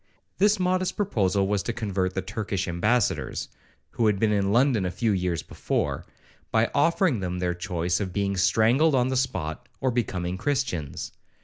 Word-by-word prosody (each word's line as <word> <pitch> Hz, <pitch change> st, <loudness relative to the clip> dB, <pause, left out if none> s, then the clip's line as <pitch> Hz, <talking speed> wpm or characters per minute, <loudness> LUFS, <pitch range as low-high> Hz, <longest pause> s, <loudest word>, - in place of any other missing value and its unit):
'—This 205 Hz, +1 st, +4 dB
modest 185 Hz, 0 st, 0 dB
proposal 100 Hz, -, +1 dB
was, 100 Hz, -1 st, +1 dB
to 115 Hz, -, -3 dB
convert 100 Hz, -5 st, -2 dB
the 95 Hz, -, -1 dB
Turkish 100 Hz, -1 st, -3 dB
ambassadors, 105 Hz, +7 st, 0 dB, 0.4 s
(who 115 Hz, -, +1 dB
had 105 Hz, -2 st, +2 dB
been 110 Hz, 0 st, +2 dB
in 100 Hz, -1 st, +1 dB
London 120 Hz, -2 st, +3 dB
a 90 Hz, -, 0 dB
few 110 Hz, +5 st, 0 dB
years 90 Hz, -4 st, -1 dB
before), -, -, -2 dB, 0.4 s
by 110 Hz, +1 st, +2 dB
offering 165 Hz, -, +2 dB
them 90 Hz, -1 st, -3 dB
their 90 Hz, -1 st, 0 dB
choice 90 Hz, 0 st, -1 dB
of 95 Hz, -3 st, -3 dB
being 100 Hz, +1 st, -1 dB
strangled 115 Hz, -, +3 dB
on 125 Hz, 0 st, +2 dB
the 130 Hz, -, -1 dB
spot, 95 Hz, -, -2 dB
or 130 Hz, -, +1 dB
becoming 95 Hz, -6 st, -2 dB
Christians. 115 Hz, -, -2 dB
100 Hz, 170 wpm, -26 LUFS, 90-125 Hz, 0.4 s, This